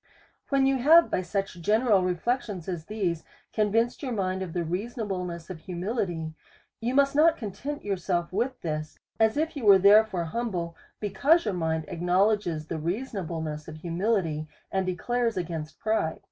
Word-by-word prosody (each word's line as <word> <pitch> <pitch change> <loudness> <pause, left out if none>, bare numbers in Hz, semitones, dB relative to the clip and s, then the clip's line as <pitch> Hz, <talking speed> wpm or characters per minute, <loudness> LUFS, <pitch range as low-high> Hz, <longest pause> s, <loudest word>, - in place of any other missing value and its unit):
When 275 -1 +3
you 270 0 +3
have, 320 +6 +6
by - - +1
such 195 -1 -3
general 215 +2 +3
reflections 185 +1 -1
as 175 -4 -4
these, 185 -6 -2 0.3
convinced 225 +3 +1
your 260 -4 -3
mind 190 -3 -1
of 180 -3 -5
the 175 - -1
reasonableness 180 -2 -4
of 170 - -7
humility, 175 -2 -3 0.5
you 240 +3 -1
must 280 0 +4
not 320 +2 +5
content 265 +7 -5
yourself 180 -3 -1
with 245 +6 -1
this, 155 -2 -4 0.2
as 220 +3 +3
if 315 +1 0
you 280 - -5
was 200 -3 +7
therefore 205 -3 +5
humble, 175 -4 -3 0.2
because 230 - +3
your 210 - 0
mind 160 -2 -1
acknow 180 +4 +2
ledges 175 -8 -1
the 160 0 -4
reasonableness 165 - -3
of 155 - -7
humility, 170 -2 -1 0.2
and 190 -1 0
declares 235 +5 -1
against 165 -3 -4
pride. 215 -8 0
190 Hz, 160 wpm, -27 LUFS, 170-230 Hz, 0.5 s, was